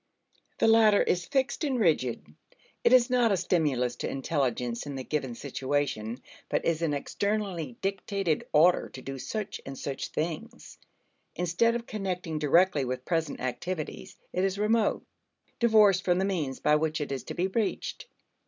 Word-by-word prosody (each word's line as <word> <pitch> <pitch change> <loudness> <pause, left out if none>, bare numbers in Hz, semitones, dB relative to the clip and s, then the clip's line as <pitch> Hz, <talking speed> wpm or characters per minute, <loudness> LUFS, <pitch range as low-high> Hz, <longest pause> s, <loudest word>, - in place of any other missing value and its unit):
The - - +3
latter 220 -2 +6
is 175 -1 0
fixed 270 +2 0
and 270 -4 0
rigid; 150 - +1 0.6
it - - +4
is 250 -1 +5
not 245 -3 +4
a 195 - +3
stimulus 145 -9 +1
to - - -3
intelligence 125 -3 -2
in 140 - -5
the 130 - -4
given 135 -4 -2
situation, 130 -4 -2 0.3
but - - 0
is 165 -1 +1
an 155 -3 +1
externally 185 - -2
dictated 195 -3 -1
order 170 +4 +4
to 130 - -10
do 135 0 -6
such 215 - -4
and 135 0 -8
such 135 0 -4
things. 160 0 -5 0.6
Instead 180 +7 +2
of 235 0 -3
connecting 180 -7 -3
directly 155 +1 +3
with 130 0 -4
present 165 -3 -1
activities, 155 +6 -4 0.2
it 185 - 0
is 195 0 0
remote, 215 +1 +1 0.6
divorced 210 -5 +5
from 180 -1 +2
the 190 - +1
means 155 -9 -2
by 150 - +3
which 155 +1 -1
it 145 -2 -3
is 135 -3 -3
to - - -6
be 175 - 0
reached. 210 - -2
170 Hz, 160 wpm, -28 LUFS, 140-200 Hz, 0.6 s, latter